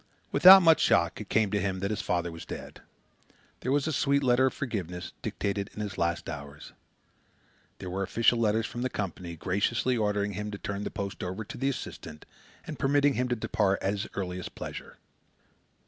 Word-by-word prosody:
Without 190 +1 +9
much 165 -1 +6
shock, - - +2
it - - -9
came 110 -3 +2
to 105 -1 0
him 95 0 -1
that 100 +2 -2
his 105 0 -2
father 85 -2 -1
was 80 0 -9
dead. - - -9 0.8
There 130 - -2
was 145 0 +2
a 155 - -1
sweet 140 +1 +2
letter 130 +1 +4
of - - -2
forgiveness, 95 - -4
dictated 100 0 -2
in - - -7
his 105 -2 -4
last 85 0 -1
hours. 70 0 -8 1.0
There - - -8
were 95 +2 -2
official 115 +4 +2
letters 110 0 +2
from 120 - -5
the 130 - 0
Company, 90 -5 -5
graciously 100 +9 0
ordering 105 -2 0
him 105 +2 -4
to 100 - -6
turn 100 0 -4
the - - -2
post 100 -1 -5
over 95 +4 -4
to - - -8
the 135 +2 0
assistant 80 - -7 0.4
and 155 - -7
permitting 145 +1 +3
him 125 0 0
to 125 - 0
depart 100 -3 +1
at 95 - +1
his 105 0 -3
earliest 90 -2 -5
pleasure. - - -8
105 Hz, 195 wpm, -28 LUFS, 95-125 Hz, 1.0 s, Without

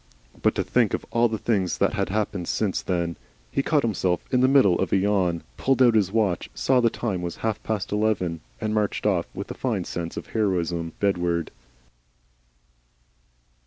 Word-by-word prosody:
But - - +2
to - - 0
think - - +2
of - - -7
all 120 0 +3
the 110 - -2
things 100 -5 0
that - - +2
had - - -1
happened 100 -3 -2
since 105 -4 0
then! 85 -2 -2 0.3
He 135 - +1
caught 150 +1 +1
himself 95 -6 0
in 125 - +3
the 130 - +5
middle 130 -10 +5
of - - -1
a - - +4
yawn, 95 -4 +1
pulled 135 -1 +1
out 125 -3 +6
his 100 -4 +2
watch, 105 -6 0
saw 130 -1 +3
the 115 - +4
time 100 -6 -3
was 85 -1 -4
halfpast 110 -2 -2
eleven, 100 -6 0 0.2
and 110 -2 -2
marched 105 -2 -1
off, 95 -5 +1
with 100 +1 -5
a - - -3
fine 110 -8 -2
sense 85 -1 -5
of - - -5
heroism, 85 -6 -1
bedward. 85 -4 0
100 Hz, 180 wpm, -25 LUFS, 90-110 Hz, 0.3 s, out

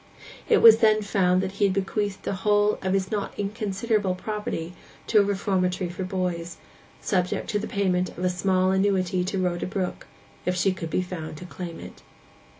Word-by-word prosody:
It 450 - +4
was 225 -1 +10
then 215 -1 +4
found 185 -2 +2
that 190 - -3
he 200 +1 +1
had 190 -1 +1
bequeathed 200 0 -2
the - - -2
whole 210 0 +3
of 190 0 -1
his 190 -1 -1
not 205 -2 -2
inconsiderable 205 -1 -1
property 185 -4 -4 0.3
to 215 - +4
a - - +5
reformatory 190 -2 0
for 185 +2 -5
boys, 180 -2 -3 0.4
subject 185 +3 -1
to 210 - 0
the 215 - -4
payment 185 -4 0
of 180 - -5
a - - +3
small 185 +1 +1
annuity 190 -2 +1
to 190 +2 -2
Rhoda 180 -2 -1
Brook, 185 -1 -4 0.4
if 180 - 0
she 185 +2 +2
could 165 -3 -6
be 185 - 0
found 165 -4 -6
to 180 - -9
claim 175 -1 -7
it. - - -11
190 Hz, 185 wpm, -25 LUFS, 180-205 Hz, 0.4 s, was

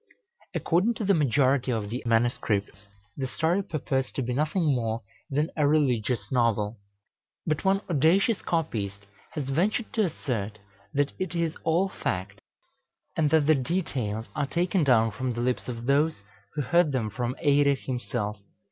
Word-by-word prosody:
According 190 +8 +2
to 215 - -3
the 200 - +4
majority 135 -3 +2
of 110 -3 -2
the 125 - -3
MSS. 110 -4 0 0.3
the 135 - -2
story 165 +8 +1
purports 135 -7 -2
to 135 - -2
be 125 +1 -2
nothing 155 +3 +1
more 115 -2 -1 0.3
than 150 +3 0
a 150 -2 +3
religious 130 -6 +1
novel; 115 -4 +1 0.7
but 155 -1 -1
one 195 0 +3
audacious 180 - +3
copyist 100 - -2 0.3
has 145 -4 -3
ventured 200 - 0
to 225 - +2
assert 115 - -3 0.3
that 145 -1 0
it 180 -2 -3
is 165 -1 0
all 170 +4 +2
fact, 100 - -4 0.8
and 155 -2 +2
that 155 -1 +4
the 155 - +6
details 125 - -2
are 145 -2 0
taken 175 +3 +1
down 115 -5 +4
from 125 +4 -2
the 120 - -3
lips 125 +1 -1
of 120 -2 -5
those 145 -3 +2 0.3
who 150 - 0
heard 170 +1 +3
them 110 -5 -1
from 125 +3 -2
Eirek 140 -2 +3
himself. 120 -5 -3
135 Hz, 155 wpm, -27 LUFS, 115-160 Hz, 0.8 s, the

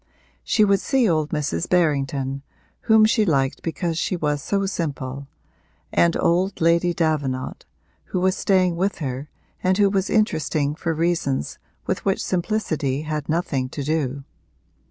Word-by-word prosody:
She 215 - +3
would 200 -1 +3
see 265 0 +2
old 155 -4 +1
Mrs. 140 - -2
Berrington, 140 -5 +1 0.5
whom 220 -1 +7
she 220 0 +3
liked 140 -8 +1
because 165 0 -2
she 185 - -1
was 150 -4 -1
so 195 +6 0
simple, 140 -7 -4 0.7
and 170 -1 +3
old 185 +3 +1
Lady 170 +1 +3
Davenant, 150 -6 -2 0.4
who 185 - -2
was 185 +1 +2
staying 185 -3 +2
with 195 +3 0
her 135 0 -4 0.3
and 185 0 +2
who 200 -2 +4
was 195 -1 0
interesting 155 -9 +1
for 165 +2 -2
reasons 160 - -1 0.3
with - - -2
which 195 -1 0
simplicity 165 -7 -1
had 155 -1 -4
nothing 145 -6 -1
to 145 - -5
do. 140 -2 -1
165 Hz, 145 wpm, -23 LUFS, 140-185 Hz, 0.7 s, whom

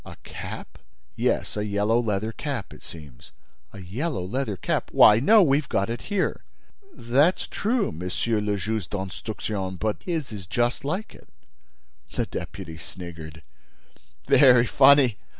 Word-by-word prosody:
"A - - -11
cap?" - - -8 0.4
"Yes, - - -1
a 105 - -2
yellow 105 +3 +1
leather 110 -1 -1
cap, 130 -4 -5
it - - -14
seems." 75 -7 -12 0.4
"A - - -12
yellow 110 - -3
leather 110 0 -3
cap? - - -2
Why, 105 +1 +7
no, 210 - +6
we've 140 -2 +1
got 100 +3 0
it 120 - -4
here!" 205 -3 -1 0.5
"That's 140 - +1
true, 230 +2 -1
Monsieur 90 +7 -2
le 105 -1 -1
Juge 110 0 -3
d'Instruction, 95 0 -4
but 105 +3 -2
his 160 -8 -3
is 100 -5 -8
just 120 +3 0
like 185 +10 -3
it." - - -18 0.8
The - - -1
deputy 80 +1 -7
sniggered: 80 -3 -10 0.8
"Very 125 -4 +6
funny! 135 -3 +5
110 Hz, 140 wpm, -25 LUFS, 95-135 Hz, 0.8 s, Why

